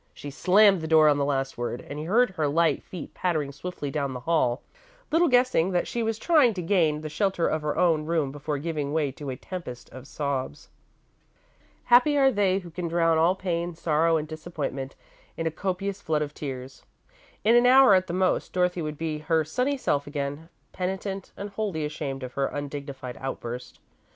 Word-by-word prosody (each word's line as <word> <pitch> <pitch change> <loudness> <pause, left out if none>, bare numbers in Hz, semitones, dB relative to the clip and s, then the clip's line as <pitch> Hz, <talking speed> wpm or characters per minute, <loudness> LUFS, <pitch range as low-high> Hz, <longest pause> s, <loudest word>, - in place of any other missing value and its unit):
She 145 - -8
slammed 195 +5 +4
the 160 - -4
door 155 -1 +6
on 145 -1 +2
the 140 - +1
last 135 -2 -2
word, 120 0 -4
and 145 - -6
he 155 - -5
heard 225 +6 +3
her 160 -5 -1
light 160 0 +2
feet 180 -4 -9
pattering 155 -6 -1
swiftly 145 -1 -6
down 140 -2 -2
the 125 - -6
hall, 125 -4 +1 0.5
little 335 +2 +4
guessing 245 - +3
that 175 - +1
she 235 - -2
was 225 -1 -1
trying 285 - +4
to 180 - -3
gain 165 -5 +2
the 155 - -5
shelter 175 +2 0
of 155 - -1
her 150 0 -2
own 160 -4 +2
room 160 -5 0
before 145 +1 -4
giving 150 -1 -3
way 150 -3 +1
to 140 +1 -8
a 130 - -3
tempest 125 -5 -8
of 130 +2 -11
sobs. 140 - -4 1.1
Happy 255 +5 +5
are 270 -1 +5
they 200 -4 +2
who 180 -3 -7
can 175 +1 -4
drown 165 -1 +2
all 170 +3 +4
pain, 175 -2 -3
sorrow, 165 0 +2
and 155 0 -3
disappointment 155 -4 -5 0.4
in 165 - -3
a 160 - 0
copious 195 +3 -3
flood 155 -4 0
of 145 0 -7
tears. 130 -3 -7 0.6
In 225 +3 +5
an 240 +1 +6
hour, 260 -3 +7
at 185 -1 +3
the - - -4
most, 185 0 0
Dorothy 180 -1 +1
would 155 -1 -4
be 155 -1 -3
her 160 +1 +1
sunny 255 - -1
self 145 - -1
again, 145 +2 -4 0.2
penitent, 190 +1 -4
and 200 +1 -6
wholly 195 -7 -2
ashamed 140 -3 -5
of 125 0 -7
her 140 0 0
undignified 140 -3 -6
outburst. 125 -2 -6
160 Hz, 195 wpm, -26 LUFS, 145-185 Hz, 1.1 s, hour